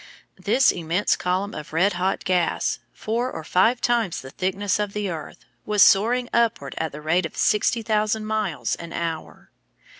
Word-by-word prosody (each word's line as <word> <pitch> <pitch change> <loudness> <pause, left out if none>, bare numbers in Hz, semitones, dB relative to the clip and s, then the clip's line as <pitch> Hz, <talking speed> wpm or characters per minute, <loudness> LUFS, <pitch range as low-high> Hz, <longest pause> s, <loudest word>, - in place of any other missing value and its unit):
This 270 - +4
immense 175 +4 0
column 185 +3 -2
of 150 0 -8
red 185 +5 +3
hot 185 +2 -1
gas, 180 -2 0
four 235 +4 -2
or - - -6
five 225 +9 +2
times 235 -7 0
the 130 - -10
thickness 195 +3 -1
of 205 -1 -2
the 205 -3 -2
earth, 160 -2 -8 0.2
was 210 -2 +4
soaring 240 +5 +4
upward 230 - +1
at 160 -1 -2
the 150 - -9
rate 160 +3 +1
of - - -17
60,000 215 0 +1
miles 200 - -1
an 170 0 -9
hour. 165 -2 -5
195 Hz, 160 wpm, -23 LUFS, 170-215 Hz, 0.2 s, This